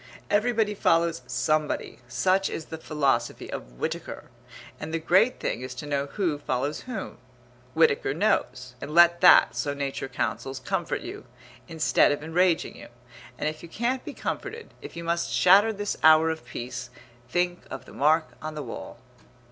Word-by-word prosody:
Everybody 215 0 +2
follows 165 -6 +2
somebody, 145 +5 -1
such 185 +10 +1
is 160 - -5
the 160 - -8
philosophy 140 -7 -1
of - - -7
Whitaker; - - -5 0.5
and 155 - -6
the 165 - 0
great 190 +10 +3
thing - - -2
is 130 0 -6
to 125 - -7
know 140 -1 -1
who 165 -3 -2
follows 140 +1 -2
whom. 220 - -6 0.6
Whitaker 160 -4 +3
knows, 130 -8 0
and 150 - -6
let 170 0 +6
that, - - +7
so 145 -1 -2
Nature 140 -1 -3
counsels, 135 +1 -3
comfort 130 - -2
you, - - -8 0.4
instead 160 -2 +3
of 145 +1 -2
enraging 170 +1 +1
you; - - -11 0.5
and - - -2
if 155 0 -4
you 170 - -11
can't 245 +7 -1
be - - -8
comforted, 460 0 -5
if - - -10
you 170 - -6
must 170 0 -1
shatter 200 +5 +5
this 205 -1 -3
hour 160 +1 +6
of 160 -6 -7
peace, 120 0 -6 0.4
think 175 +4 0
of 135 - -7
the - - -14
mark 155 +3 +2
on 155 0 -6
the 150 - -4
wall. 120 - -8
160 Hz, 165 wpm, -26 LUFS, 140-180 Hz, 0.6 s, that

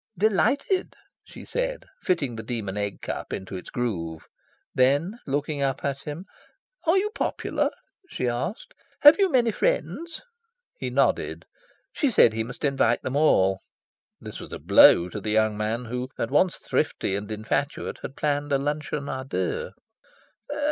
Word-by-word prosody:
"Delighted," 245 - +1 0.3
she - - -12
said, - - -2 0.2
fitting 145 -10 0
the 110 - -5
Demon 110 -4 -4
Egg 100 -1 -3
Cup - - -5
into 95 0 -5
its 90 - -7
groove. 85 -10 -3 0.5
Then, 145 - +2
looking 145 +1 -1
up 135 0 -1
at 140 0 -2
him, 150 +5 -6 0.6
"Are 335 +4 +5
you 415 +2 +1
popular?" - - -1 0.4
she 125 - -2
asked. 120 - -3 0.3
"Have 295 +6 +9
you 390 -1 +4
many 245 -6 +3
friends?" 340 - -1 0.5
He - - -4
nodded. - - 0 0.5
She 290 - +1
said 120 - +5
he 110 0 -1
must 125 +5 -6
invite 135 -4 +2
them 130 - -3
all. 95 -11 +4 0.6
This - - -8
was - - -10
a - - -5
blow 85 - +6
to 105 - -6
the 105 - -4
young 110 0 +2
man, 110 +3 -2
who, 125 +2 -4
at 115 - -2
once 170 +5 +3
thrifty 95 - -1
and 100 +1 -5
infatuate, 115 +6 -2
had 135 - -7
planned 145 0 -1
a 140 - +4
luncheon 145 0 -3
a 130 0 -3
deux. 470 - -2
140 Hz, 155 wpm, -25 LUFS, -, 0.6 s, Have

